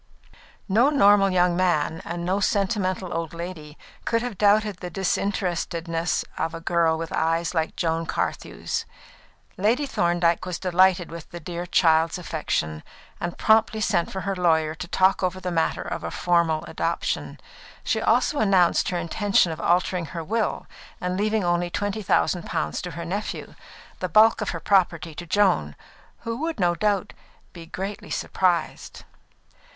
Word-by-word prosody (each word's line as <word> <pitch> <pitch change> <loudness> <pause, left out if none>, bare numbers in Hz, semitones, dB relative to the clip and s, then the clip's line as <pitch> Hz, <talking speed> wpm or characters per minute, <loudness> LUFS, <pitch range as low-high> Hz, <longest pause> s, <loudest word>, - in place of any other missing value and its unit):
No 225 +7 +4
normal 205 -8 +5
young 180 -1 +2
man, 165 -3 +1
and 170 0 -5
no 190 +3 +1
sentimental 190 -3 0
old 165 0 -4
lady, 165 -3 -7 0.3
could 230 0 0
have 245 -4 -4
doubted 210 0 +3
the 180 - -6
disinterestedness 175 -3 -1
of 165 +1 -2
a - - -6
girl 165 -1 +1
with 165 0 -5
eyes 165 +2 0
like 160 -2 -1
Joan 165 -1 -1
Carthew's. - - -3 0.7
Lady 225 +9 +2
Thorndyke 175 -8 +1
was 180 -1 -4
delighted 185 -1 +2
with 170 -1 -9
the 175 - -8
dear 175 +2 -6
child's 165 -1 +3
affection, 80 - -3 0.4
and 175 0 -4
promptly 220 0 +3
sent 190 -5 0
for 190 - -4
her 195 0 -2
lawyer 160 -3 +2
to 175 +2 -7
talk 190 +2 +2
over 185 0 -1
the 185 -1 -4
matter 165 -1 0
of - - -5
a - - -3
formal 170 -3 +1
adoption. - - -3 0.4
She - - 0
also 295 - +2
announced 190 -5 +3
her 180 - -1
intention 175 +1 +1
of 160 - -6
altering 180 0 +1
her 165 - -3
will, 220 +6 -1 0.3
and 180 0 -2
leaving 215 +1 0
only 175 0 +1
twenty 205 +3 -2
thousand 180 -2 +1
pounds - - -2
to 180 - -5
her 170 - -5
nephew, 200 +5 -4 0.5
the 185 - -3
bulk 220 +6 +5
of 210 - -2
her 165 - -4
property 175 -3 +1
to 175 +3 -8
Joan, 175 - +2 0.5
"who 230 0 -4
would 320 0 -3
no 175 -2 +3
doubt 205 +1 0 0.4
be 170 -2 -10
greatly 195 +4 -6
surprised." 175 -3 -1
180 Hz, 155 wpm, -24 LUFS, 170-200 Hz, 0.7 s, normal